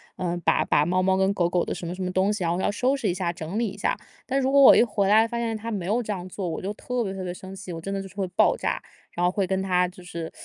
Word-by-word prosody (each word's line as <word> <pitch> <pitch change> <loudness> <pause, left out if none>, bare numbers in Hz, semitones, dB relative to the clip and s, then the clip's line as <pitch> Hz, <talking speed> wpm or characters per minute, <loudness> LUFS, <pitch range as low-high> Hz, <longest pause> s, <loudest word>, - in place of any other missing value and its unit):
嗯， 175 -1 -2
把 - - +3
把 145 - +2
猫 185 +2 +1
猫 190 0 +2
跟 190 +1 +2
狗 175 -3 +1
狗 175 0 +1
的 - - -3
什 - - -6
么 170 - -4
什 185 - -7
么 180 - -1
东 190 +2 +2
西 200 -5 -2
然 - - +1
后 - - -1
要 - - +1
收 255 +6 +1
拾 225 -8 -1
一 - - +1
下， 175 -2 -2
整 170 +6 -4
理 235 - +1
一 200 - -7
下。” 200 - 0 0.3
但 270 +1 0
如 265 - +1
果 280 +1 +5
我 270 - +10
一 - - +6
回 205 -4 +1
来 220 +2 +5
发 235 0 -4
现 225 -1 -1
他 225 +2 -6
没 195 -5 -3
有 220 +6 +1
这 215 -2 -3
样 180 -2 -6
做， 190 -1 -4
我 165 - -3
就 200 +3 -3
特 250 +2 -2
别 195 - -3
特 190 - -6
别 180 -1 -4
生 190 +1 -10
气， 190 -2 -8
我 165 - -6
真 195 +3 -4
的 195 - -2
就 195 - -8
是 190 - -18
会 195 - -1
爆 180 - +3
炸。 - - -2 0.3
然 175 - -1
后 180 - +3
会 195 -1 0
跟 190 +1 0
他 180 -1 +2
就 180 0 -14
是， 170 -2 -6
190 Hz, 370 characters per minute, -25 LUFS, 180-210 Hz, 0.3 s, 我